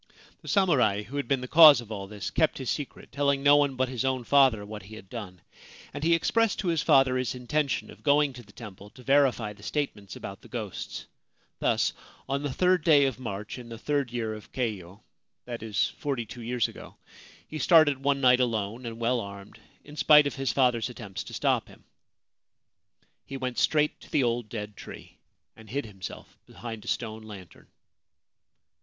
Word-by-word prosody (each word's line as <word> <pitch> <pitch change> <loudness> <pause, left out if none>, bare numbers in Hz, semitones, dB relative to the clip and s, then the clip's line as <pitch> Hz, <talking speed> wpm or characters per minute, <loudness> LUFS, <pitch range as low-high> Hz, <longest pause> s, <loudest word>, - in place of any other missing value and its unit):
The - - -14
samurai 125 - +2
who 130 +8 -7
had 140 - -2
been 135 -2 +1
the 125 - -5
cause 155 -1 +9
of 115 -2 -10
all 100 -2 -5
this 105 -1 -6
kept 160 -2 +1
his 130 -3 -3
secret, 145 -3 -6
telling 140 0 0
no 145 0 +7
one 140 -2 +2
but 130 0 0
his 125 -3 -3
own 130 -2 -1
father 130 -5 +4
what 105 0 -8
he 100 +4 -12
had 95 -3 -13
done; 95 -7 -8 0.5
and 145 +1 -6
he 170 +1 +4
expressed 225 +6 +1
to 185 - -1
his 165 -3 +1
father 135 -1 +4
his 130 0 -2
intention 140 +3 -2
of - - -15
going 145 -1 +3
to 125 - -10
the 105 -3 -18
temple 105 -2 -11
to 125 - -16
verify 130 -6 +2
the 105 - -18
statements 105 - -4
about - - -8
the - - -15
ghosts. - - -6 0.5
Thus - - +1 0.3
on 140 +1 -1
the 145 -2 -3
third 180 +3 +2
day 145 -3 +5
of 130 -3 -2
March 105 -1 -6
in 120 -1 -11
the 115 - -7
third 140 0 -1
year 115 -3 -3
of 110 -1 -11
Keio 105 -6 -4 0.4
(that 120 -2 -6
is, 110 -3 0
forty 135 -5 -2
two 115 +3 -10
years 120 -1 0
ago) - - -12 0.5
he 155 - -6
started 155 -6 +5
one 140 0 +2
night 125 -1 +5
alone 115 0 -1
and 115 0 -6
well 120 +1 +1
armed, 100 -1 -9 0.2
in 150 - -13
spite 150 -1 +6
of 140 - -2
his 135 -4 -1
father's 125 -1 +2
attempts 110 -6 -7
to - - -10
stop - - +1
him. - - -17 1.4
He 135 - -7
went 125 -2 -3
straight 150 -1 +2
to - - -15
the 140 - +2
old 120 -2 -1
dead 105 -2 -6
tree, - - -12 0.4
and 110 -1 -15
hid 140 +5 -3
himself 95 -3 -10
behind 115 -2 -8
a - - -12
stone 110 -2 -3
lantern. 100 -6 -12
125 Hz, 200 wpm, -27 LUFS, 110-140 Hz, 1.4 s, cause